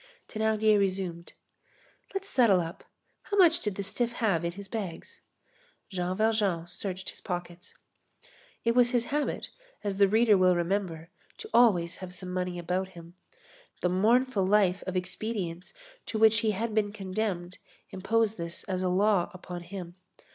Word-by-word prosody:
Thénardier 220 -1 +2
resumed: 185 -3 -2 0.8
"Let's 390 0 -4
settle 230 - +4
up. 165 -1 -5 0.4
How 410 - -3
much 345 -3 +6
did 210 -3 -3
the 200 - -3
stiff 235 +4 -2
have 200 -9 +1
in 170 0 -2
his 200 +1 -9
bags?" 195 -6 -6 0.7
Jean 180 0 -2
Valjean 210 -6 +1
searched 185 +1 -5
his - - -14
pockets. 175 -1 -6 0.9
It 230 - +2
was 245 0 +5
his 240 -2 +1
habit, 295 0 -1 0.3
as 200 -2 -2
the 200 0 +6
reader 220 +1 +5
will 185 -1 +5
remember, 175 -2 -2 0.3
to 435 - -10
always 185 -8 +4
have 180 -1 -8
some 180 0 -6
money 180 -1 -2
about 180 +2 -1
him. 170 -2 -13 0.7
The 180 - +2
mournful 220 +4 +3
life 190 -1 +3
of 185 0 -1
expedients 180 -1 -4 0.3
to 220 - -2
which 220 0 +6
he 220 - +1
had 215 +2 -2
been 210 -1 +1
condemned 190 -3 -3 0.3
imposed 220 +3 0
this 170 0 -5
as 185 -3 -3
a 185 - +1
law 195 0 +2
upon 180 -1 -7
him. 175 0 -8
190 Hz, 155 wpm, -29 LUFS, 180-220 Hz, 0.9 s, much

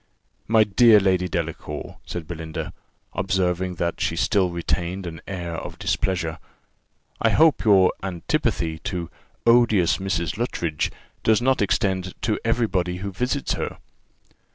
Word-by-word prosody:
"My 110 0 +5
dear 105 +2 +6
Lady 95 -2 +1
Delacour," 80 -4 -4
said 85 -2 -5
Belinda, 80 -2 -5 0.4
observing 95 -1 0
that 85 -1 -2
she - - 0
still 95 -3 +2
retained 85 +2 -2
an 80 -2 -7
air 85 -3 -4
of - - -7
displeasure, 85 -4 -1 0.8
"I - - +4
hope 160 -1 +4
your 95 -4 +5
antipathy 85 -3 -1
to 85 -2 -4 0.3
odious 115 -7 +4
Mrs. 90 0 -2
Luttridge 85 -10 -1 0.3
does 110 -1 +4
not 130 0 +2
extend 95 -2 0
to 110 -2 0
every 115 +1 +2
body 90 -3 -1
who 100 +2 -4
visits 125 +8 -1
her." - - -4
95 Hz, 130 wpm, -23 LUFS, 85-105 Hz, 0.8 s, dear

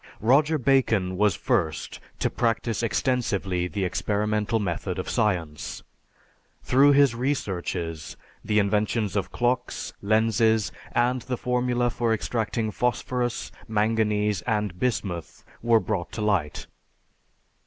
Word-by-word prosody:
Roger 145 +8 +3
Bacon 115 -9 +2
was 105 -1 +2
first 80 0 -1 0.2
to - - 0
practice 115 -1 0
extensively 100 -7 0
the 95 +1 -2
experimental 105 +4 0
method 90 -6 -3
of - - -4
science. 85 -8 -1 0.8
Through 140 +3 +5
his 140 -3 +5
researches 90 - -3 0.3
the 105 - 0
inventions 105 +1 +1
of 100 - -1
clocks, 125 +1 -1
lenses, 110 +1 +2 0.2
and 125 +1 +2
the 125 +1 -3
formula 125 0 0
for 115 -1 0
extracting 110 0 -2
phosphorus, 125 +1 -1 0.2
manganese, 105 -1 +1
and 105 -5 -1
bismuth 95 -9 -3 0.2
were 115 -1 +4
brought 95 -3 -3
to 110 - -4
light. 95 -8 0
110 Hz, 110 wpm, -25 LUFS, 100-120 Hz, 0.8 s, Through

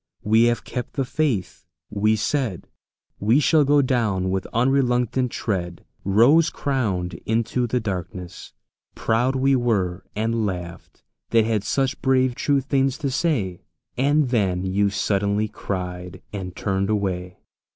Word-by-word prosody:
We 110 +2 +4
have 120 0 +1
kept 125 - -5
the 135 - -1
faith!" 125 - -2 0.2
we 105 +1 +2
said; 110 - -1 0.5
"We 110 +7 +3
shall 155 +1 +4
go 145 0 +4
down 105 -8 0
with 95 0 -2
unreluctant 125 0 +1
tread 90 -5 -3 0.2
Rose 125 - +5
crowned 105 -11 -2
into 115 +2 0
the 125 +2 0
darkness!"... 90 -4 -6 0.4
Proud 120 +4 +1
we 135 +1 +3
were, 100 -7 0
And 115 +1 0
laughed, 90 -4 -6 0.3
that 115 -1 +4
had 110 -3 0
such 135 +4 -1
brave 130 -1 +2
true 140 +2 +1
things 135 0 0
to 140 -2 -2
say. 120 - -1 0.3
And 140 +2 +2
then 95 -6 0
you 100 +2 +1
suddenly 100 +1 0
cried, 90 -2 -5
and 95 -3 -5
turned 95 0 -1
away. 90 -4 -2
110 Hz, 135 wpm, -23 LUFS, 95-130 Hz, 0.5 s, Rose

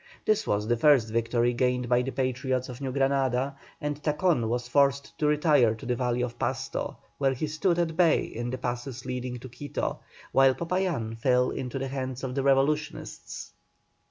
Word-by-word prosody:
This 215 0 +2
was 105 +1 0
the 120 0 +2
first 120 -4 +4
victory 120 +1 +1
gained 125 0 +1
by 125 +1 +3
the 130 - -3
Patriots 130 -1 -1
of 125 +2 -8
New 135 -2 -2
Granada, 135 0 +1 0.2
and 145 0 -3
Tacon 150 -6 +1
was 125 +1 -1
forced 140 +2 +2
to 150 - +2
retire 150 -7 +4
to 110 - -11
the 125 - 0
valley 125 0 0
of 120 -1 -5
Pasto, - - -2 0.2
where 135 -1 +2
he 140 - -2
stood 155 +4 0
at 165 -2 0
bay 170 -2 +4
in 120 +1 -5
the 130 - -3
passes 125 +1 -4
leading 125 -1 -4
to 130 - -9
Quito, 145 +3 -4 0.3
while 135 -1 +5
Popayán 170 -10 -1
fell 125 +1 +3
into 125 +1 -4
the 135 0 -2
hands 130 -1 -4
of 130 -1 -3
the 135 - 0
revolutionists. 140 +3 -1
130 Hz, 185 wpm, -27 LUFS, 125-145 Hz, 0.3 s, while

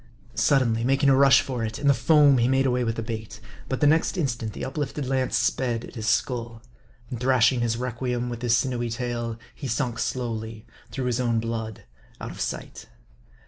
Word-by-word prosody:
Sud 135 -2 +3
denly 115 -1 0
making 135 +3 +3
a 135 - +6
rush 135 -2 +6
for 125 -4 -4
it, 110 0 -3
in 145 - -5
the 140 - +6
foam 145 -2 +5
he 120 - +3
made 135 +1 +2
away 125 -1 +1
with 115 -1 -1
the 115 - -3
bait. 110 -2 -6 0.3
But - - -2
the - - +4
next 160 +5 +3
instant, 115 - -2
the - - -5
uplifted 140 +1 -3
lance 130 -2 0
sped 120 0 0
at - - -13
his 110 -2 -5
skull; 115 0 -1 0.5
and 120 - -4
thrashing 125 -1 +3
his 115 -1 0
requiem 125 0 -2
with 120 -1 -5
his 120 -1 +3
sinewy 120 -2 -1
tail, 120 -1 -3 0.2
he 140 - -7
sunk 115 0 -2
slowly, 115 -3 -4 0.2
through 135 -2 -4
his 125 0 0
own 120 -2 +1
blood, 110 -2 -4 0.4
out - - -6
of - - -8
sight. - - -5
120 Hz, 200 wpm, -25 LUFS, 115-130 Hz, 0.5 s, a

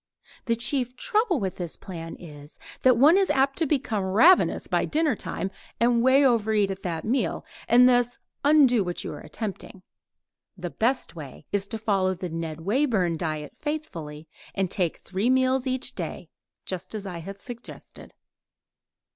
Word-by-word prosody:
The 230 - +1
chief 250 +1 0
trouble 430 - +1
with 190 -2 -3
this 175 -3 -4
plan 165 -4 -8
is, 150 -3 -12 0.2
that 255 -2 +5
one 305 +9 +6
is 390 - +1
apt 275 +2 +2
to 325 - +1
become 250 -8 0
ravenous 225 - +4
by - - 0
dinnertime 285 - -1 0.3
and 235 0 +3
over 255 -5 +4
eat 205 -2 +2
at 195 0 -6
that 165 -4 -4
meal, 225 -6 -1 0.2
and 245 +2 +7
thus 245 -1 +2 0.3
undo 280 -7 +5
what 175 -1 -4
you - - -5
are - - -8
attempting. 200 -3 -7 0.7
The 175 -1 -5
best 245 -3 -1
way 145 -6 -10
is 200 -1 0
to 225 - -4
follow 195 -4 +1
the 180 0 -5
Ned 165 -1 -5
Wayburn 205 - +1
diet 155 -2 -4
faithfully, 165 - -5 0.3
and 190 -2 -1
take 175 -4 -1
three 195 +6 -2
meals 260 0 +2
each 255 0 -1
day, - - -6 0.4
just 185 +2 -5
as 205 -2 -5
I 180 -3 -5
have 195 +4 -8
suggested. 240 +3 -10
215 Hz, 160 wpm, -26 LUFS, 180-260 Hz, 0.7 s, and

